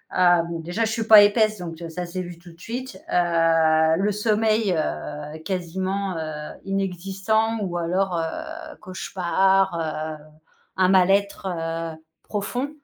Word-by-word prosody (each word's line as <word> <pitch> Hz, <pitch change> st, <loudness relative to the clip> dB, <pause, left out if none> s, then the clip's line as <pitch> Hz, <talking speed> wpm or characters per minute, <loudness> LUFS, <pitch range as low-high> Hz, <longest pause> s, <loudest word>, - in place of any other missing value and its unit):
Hem, 170 Hz, -2 st, +3 dB
déjà, 180 Hz, +7 st, -1 dB
je 220 Hz, -, -2 dB
suis 225 Hz, 0 st, -1 dB
pas 215 Hz, -1 st, +10 dB
épaisse 215 Hz, 0 st, +3 dB
donc 165 Hz, -2 st, -7 dB
heu, 165 Hz, -, -6 dB
ça 180 Hz, +2 st, -4 dB
s'est 180 Hz, +2 st, -4 dB
vu 175 Hz, -1 st, -9 dB
tout 175 Hz, -1 st, -14 dB
de 165 Hz, -, -23 dB
suite. 245 Hz, -3 st, -6 dB
Heu, 165 Hz, -2 st, +3 dB
le 200 Hz, +3 st, +1 dB
sommeil, 215 Hz, -1 st, +1 dB
heu, 150 Hz, -1 st, -4 dB
quasiment, 190 Hz, +1 st, -2 dB
heu, 155 Hz, -1 st, -5 dB
inexistant 195 Hz, +4 st, -1 dB
ou 180 Hz, -3 st, -2 dB
alors, 180 Hz, +2 st, 0 dB
heu, 315 Hz, -, -5 dB
cauchemars, 190 Hz, +1 st, +1 dB, 0.4 s
heu, -, -, -17 dB, 0.5 s
un 185 Hz, -1 st, +4 dB
mal-être, 195 Hz, +1 st, +3 dB
heu, 165 Hz, -2 st, -3 dB, 0.3 s
profond 245 Hz, +6 st, -3 dB
185 Hz, 140 wpm, -23 LUFS, 165-205 Hz, 0.5 s, pas